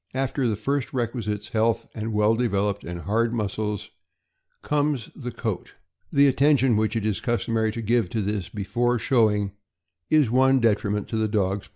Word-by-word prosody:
After 135 Hz, 0 st, 0 dB
the 110 Hz, -, 0 dB
first 135 Hz, +5 st, -2 dB
requisites, 115 Hz, -4 st, -3 dB
health 115 Hz, 0 st, +1 dB
and 110 Hz, +1 st, -4 dB
well 105 Hz, +1 st, +3 dB
developed 105 Hz, -4 st, 0 dB
and 85 Hz, 0 st, -6 dB
hard 115 Hz, +6 st, 0 dB
muscles, 105 Hz, -1 st, -3 dB, 0.7 s
comes 145 Hz, -4 st, 0 dB
the 125 Hz, -3 st, -6 dB
coat. -, -, -5 dB, 0.4 s
The 140 Hz, 0 st, +5 dB
attention 135 Hz, -2 st, +4 dB
which 110 Hz, +1 st, 0 dB
it 110 Hz, -2 st, -1 dB
is 110 Hz, -3 st, -1 dB
customary 115 Hz, -2 st, 0 dB
to 115 Hz, +1 st, -5 dB
give 115 Hz, -3 st, +1 dB
to 110 Hz, +3 st, -2 dB
this 100 Hz, -2 st, -2 dB
before 120 Hz, +5 st, 0 dB
showing 105 Hz, -5 st, +2 dB, 0.6 s
is 150 Hz, -7 st, +4 dB
one 130 Hz, +1 st, +4 dB
detriment 105 Hz, -3 st, +1 dB
to 110 Hz, -, -2 dB
the 110 Hz, 0 st, +1 dB
dog's 100 Hz, -2 st, -1 dB
popularity. -, -, -28 dB
110 Hz, 170 wpm, -25 LUFS, 105-125 Hz, 0.7 s, The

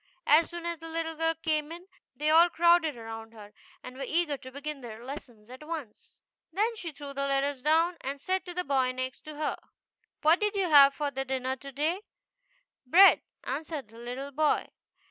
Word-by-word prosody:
As 310 Hz, +3 st, +5 dB
soon 345 Hz, -1 st, -7 dB
as 340 Hz, -1 st, -3 dB
the 325 Hz, -, -8 dB
little 325 Hz, 0 st, -3 dB
girl 325 Hz, +1 st, 0 dB
came 310 Hz, -1 st, -1 dB
in 345 Hz, +2 st, -9 dB, 0.3 s
they 305 Hz, +1 st, +1 dB
all 335 Hz, +2 st, +7 dB
crowded 340 Hz, -4 st, +3 dB
around 225 Hz, 0 st, -8 dB
her, 210 Hz, -2 st, -13 dB, 0.3 s
and 255 Hz, -, -9 dB
were 270 Hz, -, -5 dB
eager 320 Hz, +1 st, 0 dB
to 260 Hz, -1 st, -11 dB
begin 285 Hz, +1 st, -6 dB
their 230 Hz, -1 st, -9 dB
lessons 250 Hz, -6 st, -9 dB
at 255 Hz, +3 st, -11 dB
once. 300 Hz, -9 st, -8 dB, 0.3 s
Then 430 Hz, +7 st, 0 dB
she 345 Hz, -6 st, -6 dB
threw 285 Hz, -1 st, -9 dB
the 275 Hz, 0 st, -1 dB
letters 275 Hz, -1 st, 0 dB
down 325 Hz, +4 st, +2 dB
and 275 Hz, +2 st, -4 dB
said 375 Hz, +6 st, -1 dB
to 355 Hz, -, -6 dB
the 360 Hz, -, -1 dB
boy 260 Hz, -3 st, +1 dB
next 255 Hz, +2 st, -5 dB
her, 305 Hz, 0 st, -3 dB, 0.3 s
" -, -, -49 dB
What 320 Hz, +4 st, +5 dB
did 420 Hz, 0 st, 0 dB
you 375 Hz, -4 st, 0 dB
have 280 Hz, -1 st, +8 dB
for 290 Hz, -2 st, -2 dB
dinner 265 Hz, -1 st, -2 dB
to 275 Hz, +2 st, -10 dB
day?" 310 Hz, +8 st, -1 dB, 0.8 s
"Bread," 365 Hz, +10 st, +7 dB, 0.2 s
answered 290 Hz, -2 st, -5 dB
the 225 Hz, +1 st, -14 dB
little 250 Hz, +4 st, -6 dB
boy. 300 Hz, +2 st, +1 dB
295 Hz, 195 wpm, -29 LUFS, 260-330 Hz, 0.8 s, have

